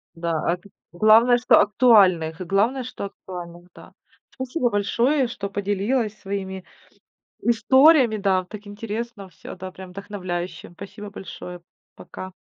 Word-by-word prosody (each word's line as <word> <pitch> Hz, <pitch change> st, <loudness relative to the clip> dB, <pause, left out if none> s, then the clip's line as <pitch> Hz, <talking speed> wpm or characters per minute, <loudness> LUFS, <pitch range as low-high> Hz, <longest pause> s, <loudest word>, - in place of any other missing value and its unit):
Да, 170 Hz, 0 st, -3 dB, 0.2 s
ак 175 Hz, +1 st, -5 dB
э, -, -, -14 dB, 0.2 s
главное, 220 Hz, +6 st, +5 dB
что 245 Hz, -, +5 dB
актуальных, 190 Hz, -8 st, +4 dB
главное, 205 Hz, +9 st, +1 dB
что 245 Hz, -4 st, -6 dB
актуальных, 175 Hz, -3 st, -10 dB
да. -, -, -15 dB, 0.4 s
Спасибо 260 Hz, 0 st, -2 dB
большое, 240 Hz, +7 st, +1 dB
что 200 Hz, -4 st, -6 dB
поделилась 205 Hz, +3 st, -1 dB
своими 190 Hz, -1 st, -5 dB, 0.8 s
историями, 255 Hz, +1 st, +5 dB
да, 195 Hz, -2 st, +1 dB
так 210 Hz, +2 st, -11 dB
интересно 210 Hz, 0 st, -6 dB
всё, 165 Hz, -, -11 dB
да, 185 Hz, 0 st, -8 dB
прям 185 Hz, 0 st, -11 dB
вдохновляюще. 185 Hz, -3 st, -6 dB
Спасибо 200 Hz, +2 st, -9 dB
большое, 180 Hz, -3 st, -9 dB, 0.3 s
пока. 185 Hz, +2 st, -9 dB
200 Hz, 125 wpm, -23 LUFS, 185-230 Hz, 0.8 s, главное